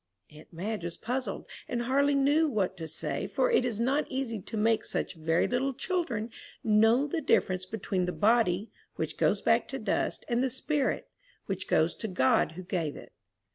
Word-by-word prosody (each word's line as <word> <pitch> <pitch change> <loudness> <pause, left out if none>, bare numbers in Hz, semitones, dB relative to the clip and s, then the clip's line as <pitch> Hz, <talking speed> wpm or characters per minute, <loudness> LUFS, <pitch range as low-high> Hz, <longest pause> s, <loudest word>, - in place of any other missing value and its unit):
Aunt 150 0 -15
Madge 195 +4 -4
was 170 0 -5
puzzled, 245 -2 -3 0.2
and 240 -1 -2
hardly 280 +3 +2
knew 290 +4 +4
what 200 -6 0
to 165 -2 -5
say, 160 - -3
for - - +1
it 460 - +4
is 235 -4 -2
not 270 +6 +1
easy 260 -6 -3
to 220 - -6
make 220 +1 +2
such - - -2
very 165 0 +1
little 255 +2 0
children 255 - -2 0.3
know 225 +5 +4
the 320 +3 -2
difference 185 -8 +1
between 190 -3 -2
the 180 - -1
body, 215 -1 +2 0.2
which - - -3
goes - - +1
back - - +3
to - - -4
dust, - - -1
and 245 -1 +1
the 265 - +1
spirit, 270 +2 -1 0.4
which 190 -1 -3
goes 160 +2 +3
to 220 - -5
God 155 -3 +2
who 185 +3 -8
gave 170 -5 -2
it. - - -11
225 Hz, 185 wpm, -29 LUFS, 185-265 Hz, 0.4 s, knew